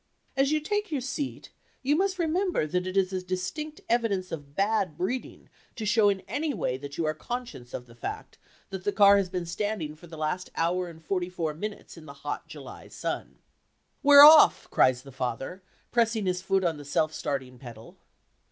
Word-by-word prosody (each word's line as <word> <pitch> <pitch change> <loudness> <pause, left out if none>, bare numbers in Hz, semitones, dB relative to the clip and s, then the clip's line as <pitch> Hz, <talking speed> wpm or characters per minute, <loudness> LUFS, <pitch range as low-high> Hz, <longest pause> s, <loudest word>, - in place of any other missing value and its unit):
As 275 +1 +2
you 310 - +2
take 415 +6 -2
your 290 - 0
seat 270 +2 -5 0.3
you 285 +3 +3
must 380 +2 +1
remember 350 - 0
that 180 +4 -2
it 185 +1 -3
is 190 0 +2
a 185 - -1
distinct 185 - -4
evidence 215 -6 0
of 145 -3 -7
bad 195 -5 0
breeding 215 +9 -4 0.3
to 220 - -5
show 210 0 +4
in 195 -1 -1
any 285 +10 -3
way 125 - -1
that 140 +2 -8
you 165 - 0
are 155 - +1
conscious 235 - -6
of 125 - -6
the 120 - -16
fact 120 - -7 0.3
that 190 -1 -5
the 205 - +1
car 200 0 +6
has 195 -2 0
been 180 -2 -3
standing 170 -3 -3
for 175 +3 -15
the 160 -1 -10
last 155 +4 -2
hour 175 +2 0
and 160 -1 -14
forty 180 -1 -1
four 165 -4 -3
minutes 205 +3 -7
in 155 -1 -12
the 140 - -9
hot - - -4
July - - -10
sun. - - -5 0.7
"We're 285 0 +10
off!" 310 0 +8
cries 130 -1 +3
father, 135 +6 -5 0.3
pressing 225 -3 +1
his 180 -1 0
foot 190 0 +1
on 165 -3 0
the 145 - -10
self 155 +2 0
starting 135 -5 -4
pedal. 115 -3 -11
185 Hz, 195 wpm, -27 LUFS, 155-235 Hz, 0.7 s, We're